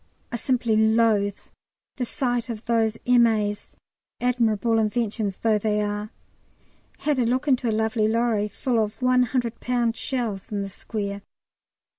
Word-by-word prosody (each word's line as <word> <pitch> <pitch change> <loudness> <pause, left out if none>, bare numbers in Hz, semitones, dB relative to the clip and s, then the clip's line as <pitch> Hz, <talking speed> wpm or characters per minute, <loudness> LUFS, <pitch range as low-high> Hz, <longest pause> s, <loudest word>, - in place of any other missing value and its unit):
I - - -2
simply 235 -2 +1
loathe 220 -2 +3 0.6
the 250 - -1
sight 245 -2 -2
of 225 -1 -6
those 225 -2 +1
M.A.'s, 225 -4 +2 0.4
admirable 230 -2 +1
inventions 215 -2 -1
though 220 -2 +2
they 210 0 0
are. 210 0 -2 0.9
Had 295 -3 0
a - - +3
look 255 +5 0
into 255 -3 +2
a - - +1
lovely 220 0 +1
lorry 225 -2 +1
full 230 +1 0
of 210 0 -6
100 250 -2 +1
lb. 240 -2 0
shells 225 -5 -3
in 200 -1 -1
the 195 - -5
square. 200 0 -5
225 Hz, 140 wpm, -24 LUFS, 210-245 Hz, 0.9 s, loathe